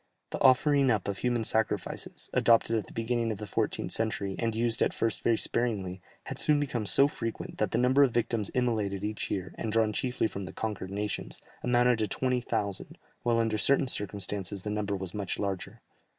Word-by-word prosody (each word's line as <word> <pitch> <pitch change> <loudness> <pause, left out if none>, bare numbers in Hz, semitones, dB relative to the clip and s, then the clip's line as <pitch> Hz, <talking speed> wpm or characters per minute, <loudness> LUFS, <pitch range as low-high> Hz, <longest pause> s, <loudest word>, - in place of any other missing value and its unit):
The - - -4
offering 135 +1 +5
up 105 -5 +1
of 100 -1 -3
human 120 -2 0
sacrifices, 110 0 -1
adopted 115 0 +4
at 110 - -2
the - - -11
beginning 115 0 -1
of 105 - -4
the 105 - -6
14th 100 - -2
century, 105 -3 0
and 115 -1 -1
used 115 +1 +2
at - - +2
first 115 - 0
very 115 -1 +2
sparingly, 100 -6 -2 0.2
had - - -5
soon 150 -1 +3
become 125 -7 -2
so 140 +9 +6
frequent, 115 -6 -6
that 105 - +1
the 115 - -1
number 125 +3 +4
of 140 - +6
victims 115 -3 -1
immolated 110 -6 0
each 105 0 -3
year, 95 -2 -3
and 110 - -2
drawn 110 -1 +2
chiefly 125 +2 -1
from 100 -3 -3
the - - -9
conquered 105 -4 -4
nations, 105 +1 -4 0.2
amounted 120 -1 +3
to 110 - +1
20,000, 120 -5 -2 0.2
while 120 -1 +1
under 115 -2 +1
certain 140 +2 +3
circumstances 100 -3 -1
the 105 - -3
number 105 -1 -1
was 95 -2 -6
much 100 -3 -3
larger. 100 -2 -4
110 Hz, 195 wpm, -29 LUFS, 100-120 Hz, 0.2 s, so